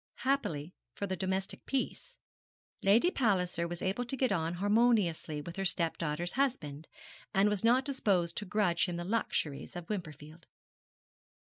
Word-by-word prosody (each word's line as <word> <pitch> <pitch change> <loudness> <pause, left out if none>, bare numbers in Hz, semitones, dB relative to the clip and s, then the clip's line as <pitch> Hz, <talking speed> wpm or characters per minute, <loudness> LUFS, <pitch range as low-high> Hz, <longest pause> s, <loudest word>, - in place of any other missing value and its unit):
Happily 180 - 0 0.2
for 200 - -2
the 190 -1 -2
domestic 190 +1 -2
peace, 275 - -3 0.6
Lady 225 - +5
Palliser 180 - +1
was 175 0 -6
able 195 +6 0
to 270 +3 -3
get 255 -2 +2
on 165 -2 0
harmoniously 205 -6 +2
with 170 +4 -8
her 195 - -1
stepdaughter's 165 -1 0
husband, 160 - -1 0.5
and 195 +2 +5
was 210 -1 -1
not 245 +3 +4
disposed 200 -11 +1
to 210 - -3
grudge 180 -3 +1
him 175 - -3
the 175 - -3
luxuries 175 -10 -2
of 175 -1 -6
Wimperfield. 155 -4 -7
190 Hz, 145 wpm, -32 LUFS, 170-225 Hz, 0.6 s, Lady